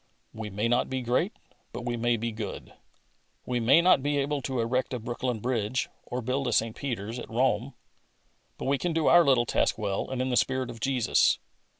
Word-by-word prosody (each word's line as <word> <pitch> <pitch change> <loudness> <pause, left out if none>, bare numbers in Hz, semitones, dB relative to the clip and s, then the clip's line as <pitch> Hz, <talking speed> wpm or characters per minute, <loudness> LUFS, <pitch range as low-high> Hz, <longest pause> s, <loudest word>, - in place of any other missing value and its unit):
We 110 -1 -6
may 105 +3 -1
not 120 +1 +1
be 130 -1 -2
great, 125 - +1 0.4
but 120 - -6
we 120 -1 -1
may 120 0 +1
be 115 +1 -2
good. 110 -2 -7 0.7
We 125 -1 -1
may 120 +8 +5
not 175 -6 +5
be 145 +1 0
able 140 0 -1
to 130 -1 -3
erect 125 +3 0
a - - -4
Brooklyn 120 +1 -3
bridge 120 0 -1 0.2
or 125 0 -4
build 130 +3 -1
a - - 0
St. 110 0 +1
Peter's, 115 -3 -4
at - - -8
Rome, 125 +1 0 0.8
but - - -6
we 135 0 +1
can 175 +4 -1
do 160 -1 0
our 175 0 +7
little 130 -5 +3
task - - +1
well 100 -3 -2
and 130 -1 -3
in 130 +1 0
the 125 - +2
spirit 130 -2 +1
of 115 - -11
Jesus. 125 -3 +2
125 Hz, 210 wpm, -28 LUFS, 115-130 Hz, 0.8 s, our